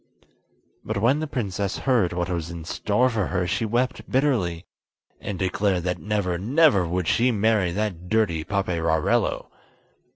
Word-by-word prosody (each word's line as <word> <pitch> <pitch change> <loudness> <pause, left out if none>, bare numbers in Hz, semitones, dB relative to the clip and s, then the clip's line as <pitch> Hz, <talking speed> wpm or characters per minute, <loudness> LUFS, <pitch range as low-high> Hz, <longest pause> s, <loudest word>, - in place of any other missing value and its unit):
But 110 - -3
when 125 +7 +3
the 155 - -3
princess 100 -7 -3
heard 120 -10 +1
what 90 -1 -2
was 85 -3 -3
in 85 -2 -7
store 105 +8 +1
for 110 -6 -1
her 90 -2 -1
she 95 +6 -1
wept 120 +4 -1
bitterly, 110 - 0 0.5
and 100 - -5
declared 95 -1 0
that 90 0 -2
never, 100 -5 -1
never 120 - +3
would 90 0 -2
she 120 +2 +3
marry 105 -5 +2
that 90 -3 -3
dirty 95 -8 +1
Paperarello! 85 -5 0
100 Hz, 150 wpm, -24 LUFS, 90-115 Hz, 0.5 s, when